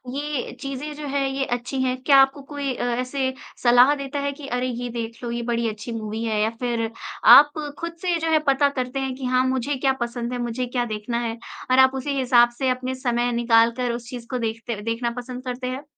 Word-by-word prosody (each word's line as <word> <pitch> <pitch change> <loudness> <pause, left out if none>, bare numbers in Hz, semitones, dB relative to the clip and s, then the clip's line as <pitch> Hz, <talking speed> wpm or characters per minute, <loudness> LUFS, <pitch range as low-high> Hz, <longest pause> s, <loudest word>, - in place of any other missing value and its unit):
ये 290 -2 -3
चीज़ें 275 +2 -5
जो 295 0 -6
है 275 0 0
ये 270 0 -1
अच्छी 245 +2 -2
हैं 255 -1 +1
क्या 275 0 +6
आपको 270 +1 +2
कोई 280 -1 -4
अ, - - -4 0.2
ऐसे 260 +1 -2 0.3
सलाह 245 +3 +6
देता 280 0 -4
है 280 0 -1
कि, 280 0 -10
अरे! 250 0 -1
ये 245 0 -4
देख 230 +1 -6
लो 235 - -3
ये 235 0 -2
बड़ी 235 0 0
अच्छी 215 +2 -7
मूवी 220 0 -4
है, 220 -2 0
या 220 - +2
फिर 235 -2 -1 0.4
आप 280 +6 +9 0.3
ख़ुद 335 0 -4
से 360 -2 +1
जो 325 0 -1
है 315 - +5
पता 275 +1 +4
करते 260 -1 -3
हैं 265 -1 -2
कि, 260 0 -6
हाँ, 255 0 +2
मुझे 260 +2 -1
क्या 265 0 +1
पसंद 240 0 -3
है, 245 - -3
मुझे 240 +1 -2
क्या 245 0 -1
देखना 220 +2 -3
है 230 -1 -3 0.3
और 255 - +5
आप 265 0 +6
उसी 275 +1 -2
हिसाब 245 -2 +5
से 265 -1 +1
अपने 255 +1 -2
समय 245 -2 0
निकाल 230 -1 +4
कर 250 -1 0
उस 235 0 -7
चीज़ 245 -2 -8
को 255 - -2
देखते 230 -1 -3
देखना 230 +2 -2
पसंद 250 0 -6
करते 250 0 -4
हैं? 260 +3 -4
250 Hz, 235 wpm, -23 LUFS, 235-270 Hz, 0.4 s, आप